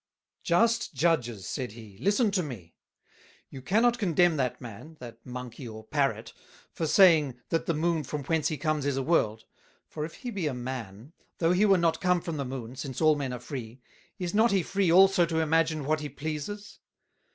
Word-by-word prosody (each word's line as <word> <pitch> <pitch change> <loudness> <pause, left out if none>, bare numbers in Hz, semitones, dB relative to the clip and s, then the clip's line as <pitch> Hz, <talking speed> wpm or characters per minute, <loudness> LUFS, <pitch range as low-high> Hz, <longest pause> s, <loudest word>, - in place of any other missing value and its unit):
"Just 225 0 +2
Judges," 125 - 0
said 125 -6 -4
he, 110 -4 -13
"listen 205 - +2
to 190 -2 +1
me; 115 - -8 0.8
you 130 - -8
cannot 235 - +2
Condemn 175 -3 +3
that 130 -3 -1
Man, 125 +7 -10
that 115 -2 -11
Monkey 125 0 -8
or 110 -1 -9
Parrot, 140 +3 -1 0.4
for 160 - -3
saying, 155 -8 +5
That 165 - -1
the 170 - +1
Moon 165 0 0
from 145 +2 -5
whence 160 +2 0
he 155 - -2
comes 150 -1 -1
is 140 -2 0
a 135 - 0
World; 110 -9 +1 0.4
for 150 - -6
if 155 - -6
he 245 - -6
be 190 -7 -2
a 140 - -2
Man, 125 0 -7 0.2
though 165 0 +2
he 195 +4 +4
were 195 -1 +5
not 170 -2 +1
come 180 -1 +3
from 165 -2 -5
the 140 - -2
Moon, 125 -2 -6
since 130 -1 -6
all 155 -1 +5
Men 140 -3 -3
are 125 - -5
free, 125 -1 -7 0.4
is 180 -3 -4
not 220 +3 +4
he 195 -4 +2
free 195 -2 +1
also 190 +1 +6
to 165 -1 -1
imagine 160 -1 +1
what 155 +2 +1
he 150 -1 -5
pleases? 155 +9 -6
155 Hz, 195 wpm, -28 LUFS, 125-175 Hz, 0.8 s, also